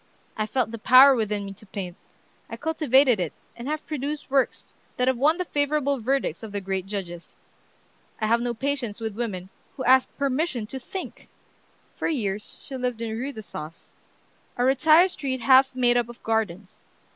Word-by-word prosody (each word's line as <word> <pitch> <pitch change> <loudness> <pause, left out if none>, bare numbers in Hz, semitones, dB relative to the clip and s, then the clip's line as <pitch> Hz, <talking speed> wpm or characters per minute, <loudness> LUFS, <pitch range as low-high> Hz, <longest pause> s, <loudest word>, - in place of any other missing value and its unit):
I 215 0 -2
felt 250 0 0
the 230 - -6
power 260 +5 +8
within 210 -4 -1
me 195 - -7
to 205 - -16
paint; 185 -3 -6 0.5
I - - -6
cultivated 275 - +3
it, 175 -4 -2 0.2
and 240 +2 -8
have 305 +1 -3
produced 295 -1 -4
works 270 -2 0 0.2
that 250 - +1
have 260 - +3
won 305 +5 +3
the 365 - -2
favorable 285 -2 0
verdicts 265 +4 -1
of 220 -2 -8
the 205 - -2
great 190 -1 -3
judges. 180 -4 -6 0.8
I 220 - 0
have 230 +2 +2
no 240 0 -2
patience 255 -4 -2
with 220 -2 -4
women 195 -6 -4 0.3
who 260 - -3
ask 260 +1 +5
permission 275 -3 -1
to 265 +5 -7
think!" 375 +9 -8 0.7
For - - -2
years 210 - -3
she 275 - -7
lived 250 -2 -2
in 220 -1 -3
Rue 260 +5 -3
d'Assas, 170 - -10 0.6
a 245 - +1
retired 310 +7 +5
street 265 -6 -3
half 265 +1 +5
made 245 -1 +3
up 240 -1 0
of 240 - -13
gardens. 210 -4 -2
245 Hz, 180 wpm, -25 LUFS, 210-275 Hz, 0.8 s, power